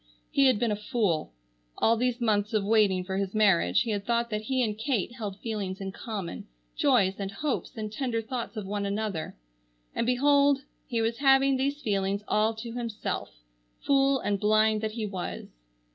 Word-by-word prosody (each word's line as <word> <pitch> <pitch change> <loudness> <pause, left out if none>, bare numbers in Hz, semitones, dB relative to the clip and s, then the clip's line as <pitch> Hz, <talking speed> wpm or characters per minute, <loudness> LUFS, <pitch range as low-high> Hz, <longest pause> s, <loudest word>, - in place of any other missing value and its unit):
He 275 -1 +4
had 255 -4 +4
been 230 +1 0
a - - +1
fool. 210 - -1 0.5
All 230 - +4
these 245 +1 0
months 215 -2 +1
of 210 - +2
waiting 205 -4 +3
for 190 +1 -3
his 195 +1 -2
marriage 180 - +4
he 230 - -3
had 205 -1 -2
thought 235 +1 0
that 210 0 -1
he 255 +3 0
and 215 -3 -1
Kate 230 -2 -1
held 210 -6 -5
feelings 205 -4 -3
in 195 -1 -4
common, 195 - -6 0.3
joys 205 -9 +3
and 195 -1 -3
hopes 265 +4 -3
and 215 -1 -4
tender 245 -1 -1
thoughts 230 0 -5
of 210 - -4
one 200 +1 -2
another; 200 -5 -3 0.6
and, 230 - -1
behold, 280 +2 +4 0.2
he 230 -2 -1
was 230 +1 0
having 270 -1 +5
these 280 +3 -1
feelings 200 -1 0
all 215 +1 +2
to 230 +1 -7
himself, 230 -3 -4 0.5
fool 275 -1 +3
and 200 -2 -1
blind 215 +1 +3
that 215 -1 -2
he 225 -1 -3
was! 190 -3 -5
220 Hz, 185 wpm, -28 LUFS, 200-245 Hz, 0.6 s, having